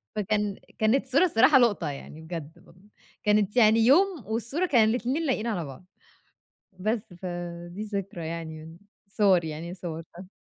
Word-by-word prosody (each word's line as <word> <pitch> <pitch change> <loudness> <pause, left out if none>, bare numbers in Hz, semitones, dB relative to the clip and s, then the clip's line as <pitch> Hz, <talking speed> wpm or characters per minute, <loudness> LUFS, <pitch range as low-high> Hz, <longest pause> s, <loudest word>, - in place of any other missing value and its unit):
فكان 210 -1 0 0.2
كانت 225 +6 +2
صورة 275 +7 +3
الصراحة 260 -5 +5
لقطة 225 -10 +2
يعني 145 +2 -9
بجد. 165 +1 -9 0.5
كانت 210 +2 +2
يعني 220 -1 +6
يوم 310 - +4
والصورة 235 +11 -1
كان 230 -9 +4
الاتنين 255 +8 -1
لايقين 235 -4 0
على 180 -8 -2
بعض، 135 +5 -11 0.9
بس 215 -1 -2
فدي 175 +1 -6
ذكرى 195 -5 -5
يعني، 160 0 -7 0.3
صور 195 -5 +3
يعني 160 +3 -6
صورتها. 170 +1 -8
200 Hz, 130 wpm, -27 LUFS, 170-230 Hz, 0.9 s, يعني